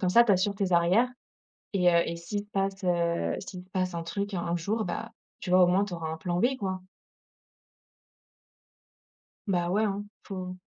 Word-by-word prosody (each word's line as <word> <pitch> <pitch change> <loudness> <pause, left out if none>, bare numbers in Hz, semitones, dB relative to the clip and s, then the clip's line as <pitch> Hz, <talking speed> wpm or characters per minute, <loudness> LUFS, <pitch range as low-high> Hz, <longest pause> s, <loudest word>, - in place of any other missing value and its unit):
Comme 185 - +1
ça, 235 +5 +7
tu 220 - +4
assures 195 +2 +2
tes 195 -2 -1
arrières 175 +8 +4 0.7
et 170 -2 +3
s'il 170 +5 -3
se - - -14
passe, 195 0 -1
heu, 170 -1 +1
s'il 180 -1 -8
se 185 - -26
passe, 185 -1 -1
heu, - - -3
un 165 - -3
truc 200 +4 -3
un 175 - -1
un 170 0 0
jour, 210 +6 -1
ben 175 - -4 0.3
tu 185 - -6
vois, 185 0 +7
au - - +5
moins, 185 +3 +3
tu 200 - -7
auras 165 -2 -4
un 160 - -4
plan 175 +1 -2
B, 255 +7 +3
quoi? 190 -2 -3 2.6
Bah 175 -3 +1
ouais, 205 +4 +2
hein, 205 -1 -1 0.2
faut 185 -2 -5
185 Hz, 195 wpm, -28 LUFS, 175-200 Hz, 2.6 s, ça